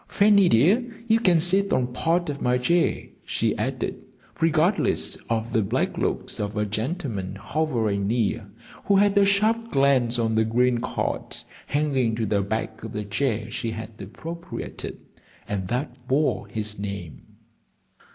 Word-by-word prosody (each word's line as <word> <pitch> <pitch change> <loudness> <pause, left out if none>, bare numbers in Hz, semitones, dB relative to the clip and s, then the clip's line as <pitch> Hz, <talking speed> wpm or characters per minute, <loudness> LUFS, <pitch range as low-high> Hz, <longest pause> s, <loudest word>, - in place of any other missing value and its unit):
Fanny 200 -3 +5
dear, 215 - +3
you 225 0 +4
can 180 -7 +4
sit 190 +4 +2
on 125 -1 +1
part 170 +6 +1
of 145 -1 -4
my 125 0 +2
chair," 170 +7 +2 0.2
she - - 0
added, - - -3 0.4
regardless 165 +4 +2
of 115 0 -1
the 110 - +3
black 100 - 0
looks - - -2
of 105 +1 -3
a 105 - +1
gentleman 110 - -3
hovering 110 -3 -1
near, 110 -1 0 0.4
who 200 - +3
had 200 +1 +4
a 200 - +6
sharp 215 +4 +2
glance 135 - +3
on 115 -1 +1
the 110 0 +3
green 120 +2 +2
card - - -2 0.3
hanging 135 -6 +1
to 110 0 -1
the 100 -1 +1
back 110 +2 -3
of 115 0 -6
the 105 -1 -3
chair 110 +1 -1
she 115 - -2
had 110 0 -6
appropriated 165 - -7 0.5
and 95 -3 -2
that 125 +2 -4
bore 145 +4 +1
his 105 -2 -3
name. 100 -6 -6
125 Hz, 150 wpm, -25 LUFS, 110-170 Hz, 0.5 s, a